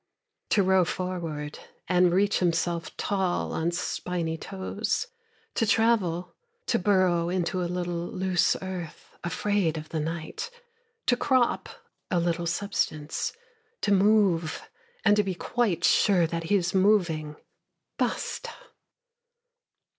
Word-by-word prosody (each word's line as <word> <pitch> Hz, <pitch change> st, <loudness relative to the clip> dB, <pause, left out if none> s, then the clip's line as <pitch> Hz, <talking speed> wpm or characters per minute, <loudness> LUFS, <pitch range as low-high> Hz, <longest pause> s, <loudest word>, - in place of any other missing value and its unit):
To 200 Hz, -, +4 dB
row 190 Hz, 0 st, +4 dB
forward, 165 Hz, -5 st, -4 dB, 0.3 s
and 180 Hz, 0 st, +4 dB
reach 200 Hz, +3 st, +2 dB
himself 170 Hz, -1 st, 0 dB
tall 190 Hz, -3 st, 0 dB
on 165 Hz, +1 st, 0 dB
spiny 170 Hz, -1 st, -2 dB
toes, 200 Hz, -, -3 dB, 0.5 s
To 225 Hz, -, +1 dB
travel, 195 Hz, -7 st, +2 dB, 0.3 s
to -, -, +1 dB
burrow 180 Hz, -3 st, +3 dB
into 180 Hz, 0 st, -1 dB
a 175 Hz, -, -1 dB
little 175 Hz, -1 st, -2 dB
loose 185 Hz, -1 st, +1 dB
earth, 180 Hz, -4 st, -7 dB
afraid 175 Hz, -1 st, 0 dB
of 155 Hz, 0 st, -7 dB
the 160 Hz, -, -2 dB
night, 165 Hz, -, -4 dB, 0.6 s
To 245 Hz, -, +4 dB
crop 255 Hz, -1 st, +1 dB, 0.4 s
a 180 Hz, -, +2 dB
little 170 Hz, 0 st, 0 dB
substance, 160 Hz, -, -1 dB, 0.5 s
To 205 Hz, -, +1 dB
move, 195 Hz, -5 st, +3 dB, 0.4 s
and 205 Hz, -1 st, +6 dB
to 210 Hz, -, +4 dB
be 190 Hz, -2 st, -2 dB
quite 190 Hz, -4 st, 0 dB
sure 185 Hz, -5 st, +4 dB
that 165 Hz, 0 st, -3 dB
he 205 Hz, -, +2 dB
is 180 Hz, -2 st, +1 dB
moving: 175 Hz, -6 st, +2 dB, 0.6 s
Basta! -, -, -2 dB
180 Hz, 120 wpm, -27 LUFS, 170-200 Hz, 0.6 s, and